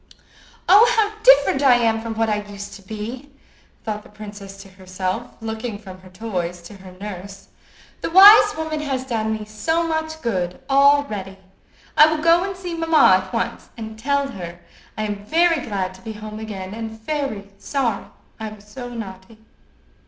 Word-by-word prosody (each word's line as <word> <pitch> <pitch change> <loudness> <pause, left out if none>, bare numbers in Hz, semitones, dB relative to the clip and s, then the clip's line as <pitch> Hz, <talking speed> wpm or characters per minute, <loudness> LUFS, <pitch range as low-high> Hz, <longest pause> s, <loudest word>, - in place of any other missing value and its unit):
"Oh! 420 +6 +7
how 425 -1 +3
different - - +5
I 265 -3 +6
am 225 -2 +1
from 225 0 -5
what 225 0 +1
I 210 -1 0
used 200 0 -9
to 200 - -11
be!" 220 +7 -7 0.5
thought 210 -1 -4
the - - -17
princess 205 -2 -10
to - - -15
herself, 185 +4 -4
looking 220 0 -4
from 190 -3 -12
her 185 - -15
toys 185 -3 -4
to 170 - -11
her 190 -1 -13
nurse. 195 -1 -8 0.5
"The - - -2
wise 405 +2 +8
woman 315 -1 -3
has 270 -3 -3
done 220 -4 -1
me 215 -1 -3
so 320 +11 -1
much 315 0 -3
good 180 -6 -2
already! 270 -9 +3 0.6
I 305 - +8
will 310 -1 -1
go 335 +1 +5
and 385 -1 -4
see 360 -2 -6
mamma 320 - +5
at 190 - -13
once, 235 0 -3
and 220 -1 -8
tell 280 +3 0
her 175 -6 -8 0.4
I 215 - -2
am 205 -1 -4
very 330 +5 +2
glad 190 -4 -3
to 185 - -16
be 220 +2 -7
at 210 - -12
home 215 0 -7
again, 200 -3 -6
and 220 0 -7
very 220 -6 -4
sorry 245 -7 -1 0.3
I 220 -1 -4
was 210 -1 -14
so 245 +3 -8
naughty." 210 -2 -9
220 Hz, 180 wpm, -21 LUFS, 200-285 Hz, 0.6 s, wise